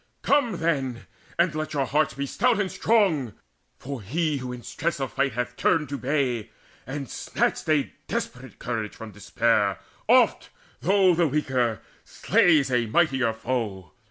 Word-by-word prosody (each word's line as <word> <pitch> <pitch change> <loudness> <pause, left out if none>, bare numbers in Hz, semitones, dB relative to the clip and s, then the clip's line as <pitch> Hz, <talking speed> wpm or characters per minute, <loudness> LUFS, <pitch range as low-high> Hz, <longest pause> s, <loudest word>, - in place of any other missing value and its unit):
Come 245 -9 +2
then, 135 -8 -1 0.3
and 170 -1 +2
let 155 0 -4
your 140 -2 +1
hearts 150 0 +1
be 140 +1 -2
stout 140 - +1
and 195 -2 -1
strong 180 - +2 0.4
For 135 -2 -6
he 150 - -1
who 130 -1 -5
in 125 -1 -8
stress 170 -4 -3
of 135 -2 -3
fight 140 -3 0
hath 125 +1 -3
turned 150 +1 +1
to 140 - -3
bay 125 -5 -1 0.4
And 135 0 -5
snatched - - -2
a 150 -3 +1
desperate 125 -3 -5
courage 115 -3 -4
from 110 -1 -9
despair, 100 0 +1 0.3
Oft, - - +4 0.3
though 190 0 +4
the 170 0 +2
weaker, 130 -6 0 0.2
slays 150 -6 +3
a 120 -2 +1
mightier 130 -3 +2
foe. 110 -7 -4
135 Hz, 155 wpm, -25 LUFS, 120-155 Hz, 0.4 s, Oft